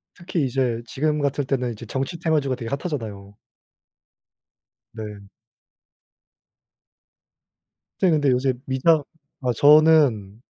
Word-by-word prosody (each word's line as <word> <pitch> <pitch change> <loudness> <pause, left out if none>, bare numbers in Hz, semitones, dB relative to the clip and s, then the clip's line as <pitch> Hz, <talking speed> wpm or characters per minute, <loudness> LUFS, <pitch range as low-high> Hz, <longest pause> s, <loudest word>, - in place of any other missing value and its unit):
특히 175 -4 -2
이제 125 -3 -1
지금 150 +5 -1
같을 140 0 -1
때는 125 -2 -1
이제 105 - -10
정치 135 +5 -4
테마주가 150 -5 0
되게 120 -2 -7
핫하잖아요. 115 - -5 1.6
네. 105 -3 -9 2.7
선생님 165 -5 +2
근데 140 -2 +3
요새 130 +1 +1
미장 145 +4 +2 0.4
아 125 -1 0
저는 145 -8 +4
135 Hz, 215 characters per minute, -23 LUFS, 115-150 Hz, 2.7 s, 저는